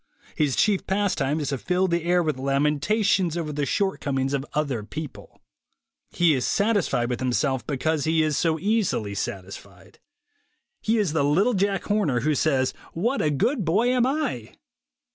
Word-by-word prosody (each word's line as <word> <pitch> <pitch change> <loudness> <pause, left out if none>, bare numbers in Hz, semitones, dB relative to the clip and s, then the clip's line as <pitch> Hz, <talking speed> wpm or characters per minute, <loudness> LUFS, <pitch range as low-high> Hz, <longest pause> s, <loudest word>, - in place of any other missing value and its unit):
His 145 -4 +1
chief 205 -3 +1
pastime 185 -7 0
is 145 - -2
to 135 -2 -2
fill 180 +5 +1
the 170 -1 -1
air 175 0 +3
with 155 -5 -2
lamentations 150 +7 +1
over 155 -3 -3
the 145 -1 -1
shortcomings 140 -7 -1
of 135 -1 -1
other 140 -7 -1
people. 150 +6 -9 0.7
He 170 -3 +3
is 130 -3 0
satis 205 -2 +1
fied 120 0 0
with 125 -1 -3
himself 130 +1 -1
because 150 +2 -1
he 160 0 +2
is 155 -1 0
so 160 +2 +1
easily 195 - 0
satisfied. 95 -1 -7 0.8
He 225 +1 +1
is 200 -8 0
the 160 - +1
little 185 +12 +2
Jack 195 -1 0
Horner 180 - 0
who 155 +4 +1
says, 135 -3 +1 0.2
"What 235 +11 0
a 150 - +2
good 215 - 0
boy 205 +9 +2
am 250 -1 +2
I 265 - -3
155 Hz, 165 wpm, -24 LUFS, 140-200 Hz, 0.8 s, air